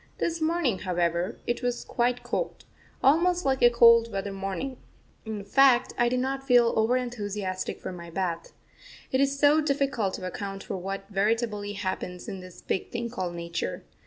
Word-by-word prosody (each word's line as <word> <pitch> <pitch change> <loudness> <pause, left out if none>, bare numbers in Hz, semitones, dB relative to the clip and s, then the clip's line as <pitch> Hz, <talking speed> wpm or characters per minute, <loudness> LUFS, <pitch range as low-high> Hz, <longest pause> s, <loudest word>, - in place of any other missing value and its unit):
This 330 -1 -1
morning, 315 - +1
however, 175 +1 -1
it 240 - -1
was 245 -1 -2
quite 245 0 0
cold - - -3 0.4
almost 350 +5 +4
like 265 -1 +1
a 240 - +8
cold 230 -1 +6
weather 195 0 -3
morning; 195 +7 -4 0.5
in 215 -2 -5
fact, 255 +3 +4
I 240 0 +2
did 250 +1 0
not 270 +1 -1
feel 245 -3 +4
over 225 +3 +3
enthusiastic 205 -6 -3
for - - -6
my 170 -2 -9
bath. 170 -1 -3 0.6
It 260 - +2
is 275 0 +1
so 295 +2 +5
difficult 275 -9 0
to 185 - -6
account 195 +2 -5
for - - -5
what 195 +2 -5
veritably 210 0 0
happens 185 -2 -4
in 195 - -5
this 185 -1 -12
big 190 - -2
thing 235 -1 -4
called 185 -7 -3
Nature. 170 - -4
225 Hz, 170 wpm, -27 LUFS, 190-255 Hz, 0.6 s, a